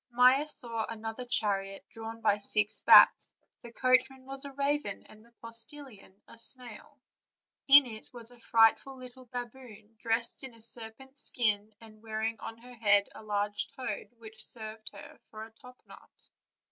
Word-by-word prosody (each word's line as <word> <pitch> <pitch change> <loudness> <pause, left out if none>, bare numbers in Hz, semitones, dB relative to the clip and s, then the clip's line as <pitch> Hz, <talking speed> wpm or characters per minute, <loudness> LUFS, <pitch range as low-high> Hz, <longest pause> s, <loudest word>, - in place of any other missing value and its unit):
Maia 255 +5 +4
saw 235 -6 0
another 225 +2 -6
chariot 195 -4 0
drawn 225 0 -9
by 210 -2 +2
six 210 0 0
bats; - - +6 0.3
the 235 - -12
coach 255 +2 +2
man 265 -1 -17
was 270 0 -9
a 280 - -8
raven, 280 -5 -2
and 215 0 -18
the 235 - -24
postilion 230 -3 -2
a 230 - -16
snail. 250 +4 -5 0.7
In 280 0 +8
it 220 -3 -11
was 235 -1 -1
a 245 - -16
frightful 230 +4 +2
little 255 0 -13
baboon, 240 -3 -10
dressed 230 +2 -1
in 260 -3 -9
a 230 - -18
serpent's 240 +4 -2
skin, 215 -3 -1
and 215 -1 -16
wearing 220 0 -4
on 225 - -8
her 245 +2 -14
head 205 -3 +2
a - - -12
large 205 -1 0
toad, 260 - -6
which 220 -1 -1
served 220 -1 -1
her 200 -1 -13
for 215 0 -9
a 225 - -17
topknot. 250 +3 -18
230 Hz, 160 wpm, -30 LUFS, 215-255 Hz, 0.7 s, In